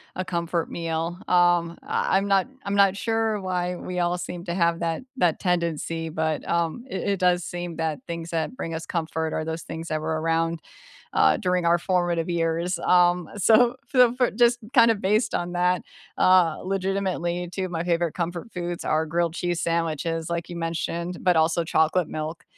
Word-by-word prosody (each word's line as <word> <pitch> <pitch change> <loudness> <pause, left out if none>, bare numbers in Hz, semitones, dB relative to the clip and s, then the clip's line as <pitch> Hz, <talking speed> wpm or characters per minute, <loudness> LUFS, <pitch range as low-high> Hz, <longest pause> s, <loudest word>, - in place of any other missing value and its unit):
a 185 0 -3
comfort 170 -1 -2
meal. 165 +1 -3
Um, 175 -1 +3
I 190 - +1
I'm 200 +1 0
not 195 +4 +3 0.2
I'm 200 0 -1
not 200 -1 +5
sure 225 -1 0
why 180 -1 -2
we 180 0 -5
all 175 0 +1
seem 175 0 -6
to 170 - -3
have 170 -2 +1
that 165 +5 -2 0.2
that 175 -7 +2
tendency, 165 -2 -1
but, 160 -1 -2
um, 170 +8 -1
it 190 - -3
it 195 - 0
does 180 -1 +3
seem 175 -1 -5
that 160 -2 -2
things 170 0 -5
that 165 +9 -2
bring 165 -7 -5
us 160 0 -4
comfort 160 -1 -2
are 155 - -1
those 160 0 -4
things 165 +1 -7
that 155 0 -1
were 160 0 -1
around, 165 0 0 0.5
uh, 80 0 +4
during 180 -1 0
our 170 +1 +4
formative 175 -2 0
years. 170 +1 0
Um, 175 -1 +3
so 235 +5 +5 0.2
f 250 -2 +6
f 250 - +4
just 240 0 +4
kind 235 -3 +7
of 205 - -2
based 210 +5 +1
on 175 0 -2
that, 180 +1 +2 0.4
uh, 180 -4 +4
legitimately 185 -2 -1
2 190 0 -2
of 180 - -6
my 165 0 -2
favorite 170 -2 0
comfort 175 +5 -4
foods 175 -1 -4
are 155 +1 +1
grilled 170 +1 0
cheese 175 -1 -1
sandwiches, 165 0 -1
like 170 0 -3
you 175 - -6
mentioned, 170 +1 -3
but 180 -2 +3
also 160 +1 +2
chocolate 160 +1 +2
milk. 155 0 -5
175 Hz, 190 wpm, -25 LUFS, 165-180 Hz, 0.5 s, kind